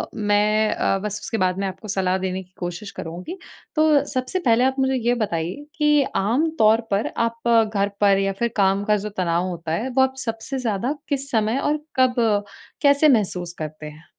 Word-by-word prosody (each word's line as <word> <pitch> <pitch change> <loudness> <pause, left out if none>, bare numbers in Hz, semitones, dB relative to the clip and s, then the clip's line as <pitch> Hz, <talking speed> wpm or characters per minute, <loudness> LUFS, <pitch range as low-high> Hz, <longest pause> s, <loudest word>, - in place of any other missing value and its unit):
मैं 210 +1 +2
अ, 195 - +1
बस 210 +1 -4
उसके 225 - -3
बाद 185 -1 +1
में 200 - -1
आपको 190 +3 -8
सलाह 190 -1 0
देने 185 0 -3
की 185 +1 -29
कोशिश 175 +3 -5
करुँगी। 180 - -6 0.4
तो 310 -2 +4
सबसे 255 +8 -1
पहले 240 -6 +3
आप 265 0 +2
मुझे 265 0 +2
ये 240 0 +1
बताइए 190 - -3
कि 300 -2 +3
आमतौर 230 0 +2
पर 200 +2 0
आप 230 0 -1 0.3
घर 200 0 +1
पर 200 -1 +5
या 195 0 0
फिर 235 - +1
काम 195 0 +2
का 210 0 +3
जो 210 +1 -5
तनाव 175 0 0
होता 170 -2 -5
है 215 +11 -1
वो 265 +1 +2
आप 265 0 +2
सबसे 225 +4 -4
ज़्यादा 235 +3 -1 0.2
किस 280 -1 -2
समय 220 +2 +1
और 295 +2 +1 0.2
कब 255 -1 +4 0.7
कैसे 285 +1 +5
महसूस 180 -7 0
करते 155 0 -6
हैं? 150 +2 -11
215 Hz, 190 wpm, -22 LUFS, 190-260 Hz, 0.7 s, पर